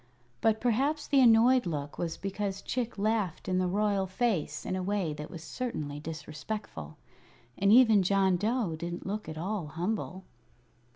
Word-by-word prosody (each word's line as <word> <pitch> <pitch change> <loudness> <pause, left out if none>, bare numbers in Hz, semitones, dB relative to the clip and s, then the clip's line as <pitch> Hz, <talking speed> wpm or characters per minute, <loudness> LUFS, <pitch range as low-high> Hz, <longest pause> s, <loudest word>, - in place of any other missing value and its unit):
But 220 -1 +3
perhaps 270 +6 +1
the 275 -2 +4
annoyed 240 0 +6
look 145 -3 -4
was 165 -2 -2
because 195 0 -3
Chick 240 -3 -3
laughed 205 -5 -1
in 185 -1 +1
the 185 - +1
royal 200 0 +1
face 190 -4 -1
in - - -2
a 185 - -2
way 190 -4 -1
that 150 0 -7
was 170 -3 -9
certainly 155 - -4
disrespectful, 155 - -6 0.6
and 200 +1 +3
even 225 -3 +7
John 190 0 +3
Dough 210 -2 0
didn't 170 +2 -5
look 210 -1 -4
at 155 - -6
all 185 0 -3
humble. 185 +3 -3
195 Hz, 160 wpm, -30 LUFS, 170-220 Hz, 0.6 s, even